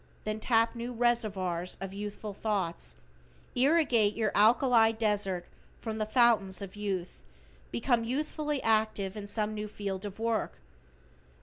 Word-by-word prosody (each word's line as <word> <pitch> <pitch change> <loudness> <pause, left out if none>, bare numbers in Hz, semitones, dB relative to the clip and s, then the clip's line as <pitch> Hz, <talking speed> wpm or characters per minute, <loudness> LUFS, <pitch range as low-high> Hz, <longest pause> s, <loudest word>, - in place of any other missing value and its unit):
Then 215 0 -3
tap 230 0 +3
new 240 +1 -5
reservoirs 200 -7 0
of 195 0 -6
youthful 205 +1 -5
thoughts, 185 - -2 0.6
irrigate 250 -7 +3
your 220 -2 0
alkali 225 +1 +5
desert 205 -5 -1 0.3
from 220 -1 -4
the 215 - -1
fountains 215 -6 +3
of 195 -1 -7
youth, 195 - -4 0.5
become 230 - +1
youthfully 295 +3 -2
active 215 -3 +1
in 205 -1 -6
some 215 +1 -1
new 210 0 -4
field 200 -2 -5
of 205 -2 -6
work. 225 - -1
215 Hz, 130 wpm, -30 LUFS, 200-230 Hz, 0.6 s, alkali